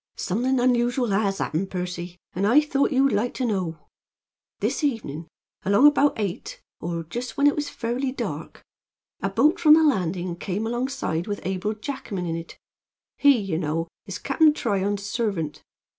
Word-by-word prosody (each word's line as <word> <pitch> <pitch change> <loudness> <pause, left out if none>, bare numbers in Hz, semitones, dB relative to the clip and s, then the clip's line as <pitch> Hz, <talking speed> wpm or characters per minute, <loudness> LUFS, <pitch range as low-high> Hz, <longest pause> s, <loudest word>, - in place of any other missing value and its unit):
"Something 250 +7 0
unusual 245 0 +2
has 195 -1 +1
happened, 185 +3 -2
Percy, 180 -1 -5 0.2
and 195 +3 0
I 245 +7 +7
thought 285 -2 +1
you'd 275 0 +3
like 215 +4 0
to 255 - -1
know. 185 -7 -1 0.8
This - - -1
evenin', 170 - -2 0.4
along 200 +8 +4
about 290 -1 +5
eight, 200 -5 -4 0.2
or 170 -1 -3
just 235 +9 -6
when 280 - +3
it 290 - +5
was 295 -1 -2
fairly 245 +3 -2
dark, 265 - -6 0.6
a 195 - 0
boat 255 +11 +3
from 310 -3 +8
the 320 - +4
landing 185 - 0
came 200 +4 -3
alongside 240 -8 -2
with 205 -4 -4
Abel 190 +3 -1
Jackman 215 -6 -5
in 165 -1 -2
it. 165 0 -8 0.6
He, 285 -2 +6
ye 195 -7 -2
know, 165 0 -2 0.2
is 195 0 -4
Cap'n 300 +2 +3
Tryon's 200 -4 -1
servant. 195 -8 -2
210 Hz, 160 wpm, -24 LUFS, 180-260 Hz, 0.8 s, from